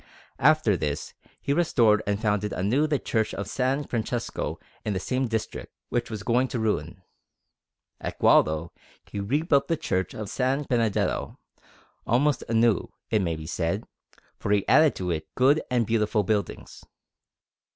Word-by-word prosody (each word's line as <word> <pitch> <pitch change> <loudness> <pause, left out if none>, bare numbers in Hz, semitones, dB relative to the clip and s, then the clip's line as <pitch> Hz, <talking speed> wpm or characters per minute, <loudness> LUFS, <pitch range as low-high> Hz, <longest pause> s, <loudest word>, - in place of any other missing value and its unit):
After 150 -7 +4
this 75 -4 -3 0.3
he 140 - +1
restored 115 -10 +3
and 100 0 0
founded 105 -2 0
anew 120 +11 +1
the 150 -1 +1
Church 110 -4 -1
of 100 - -4
S. 130 +7 -1
Francesco 120 0 -3 0.2
in 105 - -1
the 95 - -1
same 130 +6 -1
district, 110 -1 -4
which 120 -1 -1
was 110 -3 -5
going 125 +4 +2
to 125 - -4
ruin. 95 -5 -2 1.0
At - - -5
Gualdo 80 +2 +3 0.3
he 100 - -6
rebuilt 140 - +1
the 165 - 0
Church 95 -7 -2
of - - -6 0.2
S. 135 +3 +1
Benedetto; 115 -5 0 0.7
almost 140 +5 +2
anew, 115 -3 +2 0.2
it 110 - +3
may 85 -3 -1
be 80 0 -8
said, 85 +5 -2 0.6
for - - -4
he 105 -1 +2
added 155 -2 +5
to 90 -1 -2
it 80 -1 -3
good 140 +5 +4
and 125 -2 +2
beautiful 105 -1 +1
buildings. 105 +1 -3
110 Hz, 150 wpm, -26 LUFS, 100-130 Hz, 1.0 s, added